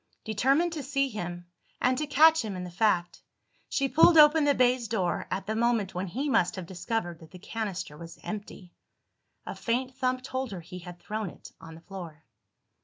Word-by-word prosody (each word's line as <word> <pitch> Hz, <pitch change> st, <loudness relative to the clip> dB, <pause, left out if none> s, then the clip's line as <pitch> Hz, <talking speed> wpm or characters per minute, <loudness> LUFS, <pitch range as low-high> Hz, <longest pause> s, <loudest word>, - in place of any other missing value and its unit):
Determined 275 Hz, +10 st, +2 dB
to 310 Hz, -, -4 dB
see 275 Hz, 0 st, 0 dB
him, 175 Hz, -5 st, -5 dB, 0.3 s
and 255 Hz, +1 st, +2 dB
to 305 Hz, -, -2 dB
catch 315 Hz, +1 st, +6 dB
him 210 Hz, -3 st, -4 dB
in 180 Hz, -, -5 dB
the 180 Hz, -, -7 dB
fact, 175 Hz, -3 st, +1 dB, 0.5 s
she 275 Hz, -, +1 dB
pulled 325 Hz, +4 st, +6 dB
open 300 Hz, 0 st, +7 dB
the 285 Hz, -1 st, +3 dB
baize 250 Hz, -1 st, +2 dB
door 185 Hz, -7 st, -1 dB
at 185 Hz, +1 st, -3 dB
the 215 Hz, +2 st, -2 dB
moment 230 Hz, -4 st, +1 dB
when 180 Hz, +2 st, -3 dB
he 260 Hz, -, -3 dB
must 230 Hz, -10 st, +2 dB
have 185 Hz, -, -6 dB
discovered 175 Hz, -1 st, -3 dB
that 160 Hz, -, -14 dB
the 185 Hz, -, -12 dB
canister 195 Hz, -5 st, -5 dB
was 165 Hz, +2 st, -10 dB
empty. 205 Hz, -4 st, -7 dB, 0.7 s
A -, -, -5 dB
faint 255 Hz, +2 st, -2 dB
thump 255 Hz, -1 st, -1 dB
told 260 Hz, -1 st, -3 dB
her 180 Hz, -, -6 dB
he 180 Hz, +2 st, -9 dB
had 175 Hz, 0 st, -10 dB
thrown 215 Hz, +1 st, -4 dB
it -, -, -13 dB
on 160 Hz, 0 st, -10 dB
the 165 Hz, -, -13 dB
floor. 170 Hz, -5 st, -9 dB
220 Hz, 195 wpm, -28 LUFS, 180-260 Hz, 0.7 s, open